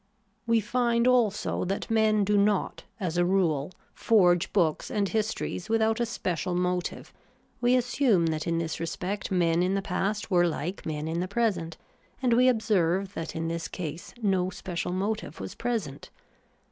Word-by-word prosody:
We 230 -1 +3
find 235 +2 +1
also 235 -5 +2
that 195 +4 -3
men 215 -2 +3
do 205 +1 +1
not, 205 -1 +1
as 175 -4 -2
a - - +4
rule, 175 -5 +1 0.2
forge 180 -5 +3
books 165 -6 +1
and 200 -1 0
histories 215 -2 -2
without 225 0 +2
a 235 - +1
special 180 -5 -2
motive; 180 0 -2 0.5
we 245 +1 +4
assume 245 -7 +2
that 155 0 -2
in 165 0 +1
this 165 -1 -3
respect 185 +4 -3
men 175 -2 +2
in 185 +2 +1
the 195 - 0
past 200 +3 -2
were 175 -1 +4
like 170 +3 -4
men 155 0 -3
in 165 +1 -2
the 180 - -1
present; 190 -7 -1 0.4
and 250 -2 +2
we 250 +2 +5
observe 195 -5 +1
that 165 -3 -5
in 165 0 -2
this 165 0 -3
case 165 -2 -6
no 185 -3 +2
special 180 -2 -4
motive 200 +4 -3
was - - -6
present. 225 - -3
190 Hz, 165 wpm, -27 LUFS, 170-220 Hz, 0.5 s, we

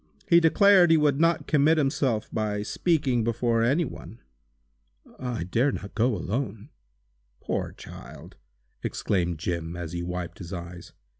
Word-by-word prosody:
He 170 - +6
declared 180 +2 +5
he 165 - +6
would 150 -2 +2
not 165 -2 +2
commit 155 +2 +3
himself 135 -6 0
by 105 -2 -1
speaking 135 -3 0
before 115 0 0
any 140 +9 +2
one." 115 - -10 1.0
"I 125 -8 -3
dare 115 +10 +1
not 100 - -7
go 115 +1 +1
alone!" 110 - -4 0.7
"Poor - - -3
child!" - - -12 0.5
exclaimed 90 -4 -1
Jim, 85 0 -3
as 85 -2 -6
he 85 0 -4
wiped 90 0 -5
his 90 0 -8
eyes. 85 -1 -8
115 Hz, 140 wpm, -26 LUFS, 90-145 Hz, 1.0 s, He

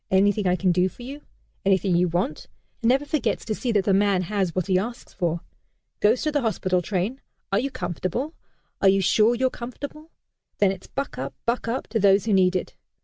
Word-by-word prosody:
Anything 200 +1 +3
I 180 - +3
can 185 0 +2
do 180 +1 +2
for 240 - -13
you? 280 +4 -7 0.4
Anything 190 -1 +2
you 180 +1 +3
want?' 170 -2 -2 0.3
and 230 - +3
never 270 +3 +3
forgets 280 -8 -1
to 215 - -1
see 240 +3 -2
that 205 -4 +2
the 195 - +3
man 195 -1 +3
has 190 -2 -1
what 185 - 0
he 185 -2 +2
asks 235 +5 -6
for. 170 -2 -1 0.6
Goes 220 +4 +3
to 305 - +1
the 290 -1 +1
hospital 185 -6 0
train 205 +8 -2 0.3
'Are 195 - +3
you 275 - -1
comfortable? 185 - -3 0.5
Are 195 - +6
you 195 +1 +4
sure 215 +5 +4
you're 260 +1 +1
comfortable?' 285 +6 -8 0.5
Then 200 -2 +4
it's 190 -1 -8
'Buck 275 - -4
up! 135 0 -4
Buck 235 0 0
up!' 235 +3 -2
to 225 +1 0
those 200 0 +4
who 220 - +1
need 185 -1 +4
it. 185 - -3
200 Hz, 210 wpm, -24 LUFS, 185-240 Hz, 0.6 s, Are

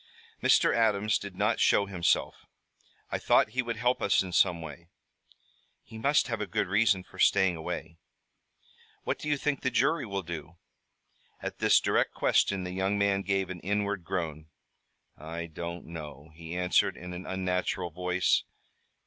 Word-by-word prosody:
"Mr. - - +4
Adams 105 -2 +2
did 100 -2 -8
not 105 +4 +1
show 100 - +4
himself. 90 -4 0 0.6
I - - -1
thought - - +3
he 130 - 0
would 120 -2 -4
help 125 +2 +1
us 100 - +3
in 90 - -7
some 90 -1 +3
way." 80 +1 -9 1.0
"He 110 0 -11
must 140 +6 +3
have 115 -3 -3
a 105 - -2
good 85 - 0
reason 100 0 +2
for - - -16
staying 95 -3 +4
away." 80 +1 -6 1.0
"What - - -2
do 150 - -4
you 145 - +2
think 145 0 -1
the 130 - +1
jury 135 +4 +1
will 100 -1 -3
do?" 85 0 -7 0.8
At - - -6
this - - +5
direct - - +1
question, 95 -2 +2
the 90 - -5
young 95 +2 0
man 100 -1 +2
gave 95 -1 -1
an 90 - -6
inward 100 0 -1
groan. 80 -4 -4 0.7
"I 85 +3 -5
don't 85 +1 -7
know," 75 -2 -9
he 85 +2 -7
answered 90 0 +2
in 90 0 -8
an 90 +1 -7
unnatural 90 -1 -2
voice. 90 +1 +1
95 Hz, 165 wpm, -29 LUFS, 85-105 Hz, 1.0 s, this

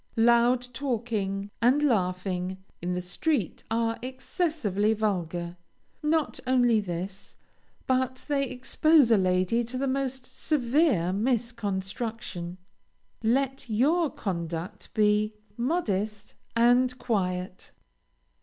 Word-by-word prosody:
Loud 240 +2 +4
talking 215 -6 -2
and 260 +5 +4
laughing 185 -5 0 0.2
in 180 +1 -1
the 180 - -3
street 220 - -1
are 230 0 0
excessively 255 - 0
vulgar. 175 -5 -2 0.4
Not 310 0 0
only 245 -3 +4
this, 190 +1 -5 0.5
but 260 0 0
they 275 -3 +1
expose 280 +1 +3
a 225 - +7
lady 185 +5 +2
to 245 +3 -5
the 275 - 0
most 265 -1 -2
severe 255 - +1
misconstruction. 215 -4 -2 0.6
Let 265 +3 0
your 295 +9 +3
conduct 175 -2 -5
be 210 0 +3 0.2
modest 215 - -1 0.2
and 245 +2 +4
quiet. 185 -6 -2
230 Hz, 100 wpm, -27 LUFS, 190-255 Hz, 0.6 s, a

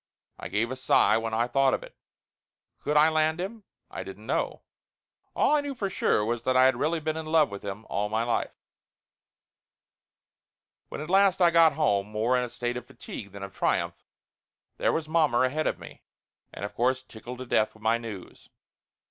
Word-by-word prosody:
I - - -6
give 115 +4 -1
a - - -3
sigh 130 -3 +3
when 115 0 -3
I 115 +1 +2
thought 135 +2 +2
of - - -7
it. - - -13 0.8
Could 150 - 0
I 150 +1 +7
land 155 +1 +1
him? 200 +3 -5 0.3
I - - -5
didn't - - -10
know. - - -2 0.7
All - - +3
I 295 - +2
knew 285 -1 -5
for 200 -5 -3
sure 105 - +1
was 115 +1 -1
that 130 +1 +1
I 130 - +7
had 130 - +4
really 160 +3 0
been 155 +1 -2
in 160 -1 -5
love 155 -6 +3
with 100 - -7
him 100 +2 -6
all 105 +1 -1
my 110 +2 0
life. 120 0 -1 2.3
When - - -6
at 155 - -7
last 195 -1 +4
I 175 -2 +5
got 165 -2 +6
home, 100 -10 +1
more 110 +4 0
in 125 - +1
a 125 - -4
state 120 +1 -3
of 125 0 -8
fatigue 100 -2 -9
than 100 0 -9
of 100 - -8
triumph, - - -1 0.7
there - - +2
was 160 -1 -2
mommer 155 -6 +3
ahead 150 +5 -1
of - - -1
me, - - -12 0.5
and 100 - -6
of 105 - -7
course 130 +2 +1
tickled 120 +1 -10
to 130 - -7
death 110 -3 +1
with 110 - -18
my 115 +1 +2
news. 110 -6 -9
130 Hz, 200 wpm, -27 LUFS, 110-155 Hz, 2.3 s, I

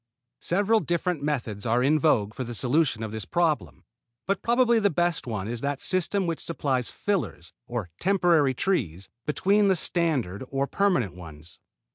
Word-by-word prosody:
Several 205 +5 +2
different 175 -4 -1
methods 120 -9 -3
are 120 +2 +1
in 150 +3 +3
vogue 110 -10 +2
for 130 - -4
the 120 -1 -6
solution 135 -2 +1
of 110 - -5
this 110 -1 -4
problem; 150 - -1 0.4
but 195 - -1
probably 235 -1 +3
the 200 -2 +3
best 175 -3 -1
one 105 -4 -3
is 120 0 -4
that 140 -1 -2
system 185 +1 +2
which 165 -2 -2
supplies 135 -7 -1
fillers 185 - -3
or 115 -8 -4
temporary 170 -8 +3
trees 100 - -1 0.2
between 200 +7 +2
the 190 - +4
standard 150 - -1
or 135 0 0
permanent 160 - +1
ones. 80 -2 -11
145 Hz, 160 wpm, -26 LUFS, 115-180 Hz, 0.4 s, the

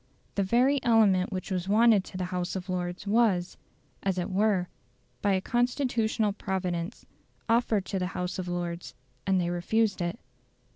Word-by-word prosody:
The 200 - 0
very 250 +8 +3
element 210 -6 +4
which 185 0 -4
was 185 0 -2
wanted 220 -1 +5
to 185 - -8
the 185 - -2
House 180 +1 -2
of 185 0 -5
Lords 180 0 -3
was, 200 -4 +2 0.5
as 195 -1 -1
it 180 +2 -2
were, 195 -2 +2 0.5
by 200 -1 +2
a 190 - +1
constitutional 240 -3 +1
providence, 185 -1 -3 0.4
offered 225 -4 +2
to 195 - -2
the 180 - -1
House 180 +1 -3
of 180 - -4
Lords, 175 -1 -4 0.3
and 190 -1 +3
they 175 -1 0
refused 200 +3 +1
it. 175 0 -2
190 Hz, 160 wpm, -28 LUFS, 180-220 Hz, 0.5 s, wanted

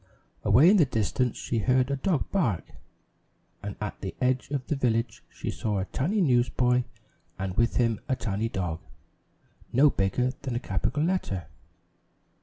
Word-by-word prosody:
Away 155 +9 +6
in 210 - +5
the 165 - +6
distance 120 0 0
she 115 - -2
heard 130 +4 +2
a - - +1
dog 155 +1 -1
bark, 120 - +1 1.0
and 100 -1 -5
at 105 -1 -5
the 95 - -5
edge 130 0 +1
of 140 -3 -2
the 150 - -1
village 115 -4 0
she - - -5
saw 105 -2 -2
a 95 - -1
tiny 190 - 0
newsboy 125 -3 +2 0.5
and 95 -1 -3
with 115 +3 +2
him 115 -3 +2
a 130 - +2
tiny 115 -2 -2
dog, 90 -6 -3 0.9
no 140 +4 +5
bigger 110 +6 +1
than 130 -4 -3
a - - 0
capital 125 +7 -1
letter. 160 - -1
125 Hz, 160 wpm, -27 LUFS, 105-135 Hz, 1.0 s, Away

